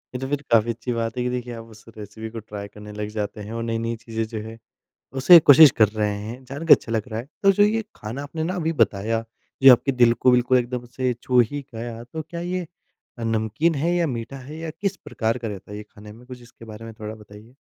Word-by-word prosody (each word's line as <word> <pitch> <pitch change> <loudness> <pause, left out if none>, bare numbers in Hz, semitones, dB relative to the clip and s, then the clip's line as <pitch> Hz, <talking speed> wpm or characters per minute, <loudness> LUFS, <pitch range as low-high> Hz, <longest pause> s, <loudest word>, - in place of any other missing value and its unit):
ये - - -2
तो 135 - -4
फिर 145 0 -1
काफ़ी 115 0 +4
अच्छी 120 +2 -5
बात 115 0 -3
है 125 - 0
कि 125 - -1
देखिए, 125 -1 -4
आप 115 0 -8
उस 110 -1 -16
रेसिपी 110 +2 -8
को 115 0 -7
ट्राय 105 -1 -8
करने 105 0 -12
लग 105 0 -4
जाते 105 0 -4
हैं 110 +2 -8
और 115 0 -3
नई-नई 115 0 -2
चीज़ें 115 0 -4
जो 110 -1 -6
हैं, 115 0 -9 0.6
उसे 135 +6 +8
कोशिश 145 0 +9
कर 105 - +7
रहे 105 -1 -1
हैं। 115 +5 -7
जान 140 +6 -7
के - - +7
अच्छा 115 - -7
लग 110 - +1
रहा 110 0 -4
है। 125 - -11 0.2
तो 195 0 +6
जो 205 - +3
ये 220 +2 +2
खाना 115 +7 -6
आपने 160 +2 -5
ना 185 +3 -2
अभी 165 -1 -1
बताया, 115 +2 +1 0.4
जो 135 -1 +11
आपके 135 +3 +2
दिल 120 -2 +5
को 125 +2 +3
बिल्कुल 125 +1 +4
एकदम 125 0 -3
से 130 -1 +1
छू 125 -1 +4
ही 145 -1 -5
गया, 115 0 -6
तो 160 +6 -6
क्या 170 +2 -8
ये 180 0 -3 0.5
अ, 115 - -4
नमकीन 115 +9 0
है 165 +5 0
या 170 -1 +1
मीठा 125 0 -5
है 140 +4 -10
या 165 -1 -5
किस 200 -1 -1
प्रकार 115 +2 -2
का 115 -2 -5
रहता 100 0 -8
है - - -6
ये 105 - -7
खाने 105 0 -13
में? 120 +3 -16
कुछ 125 -1 -10
इसके 120 -1 -15
बारे 110 0 -10
में 115 - -8
थोड़ा 110 +1 -5
बताइए। 105 +3 -15
115 Hz, 260 wpm, -23 LUFS, 110-135 Hz, 0.6 s, जो